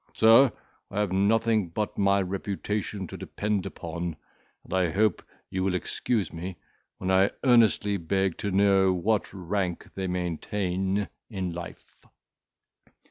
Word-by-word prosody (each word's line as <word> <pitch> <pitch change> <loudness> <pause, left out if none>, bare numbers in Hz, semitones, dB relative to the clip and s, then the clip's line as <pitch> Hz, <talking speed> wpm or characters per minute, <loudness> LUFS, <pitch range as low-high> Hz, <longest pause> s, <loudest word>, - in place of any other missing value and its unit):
Sir, 115 +4 +7 0.4
I 105 - -3
have 105 -3 0
nothing 105 0 +2
but 105 +5 -3
my 100 0 +3
reputation 100 +1 -3
to - - -8
depend 105 -2 -2
upon, 85 0 -5 0.5
and - - -9
I 90 -2 +2
hope 100 +2 +2 0.3
you 95 0 -1
will 95 -1 +1
excuse 100 +4 -1
me, 85 +2 -6 0.4
when 95 0 -2
I 95 +1 +5
earnestly 115 -5 +4
beg 95 +1 -1
to 100 - -2
know 95 -1 +4
what 100 +4 0
rank 90 -1 -3
they 95 -1 -3
maintain 95 +2 -1 0.2
in 95 -5 -3
life." 85 0 -10
95 Hz, 135 wpm, -27 LUFS, 90-105 Hz, 0.5 s, Sir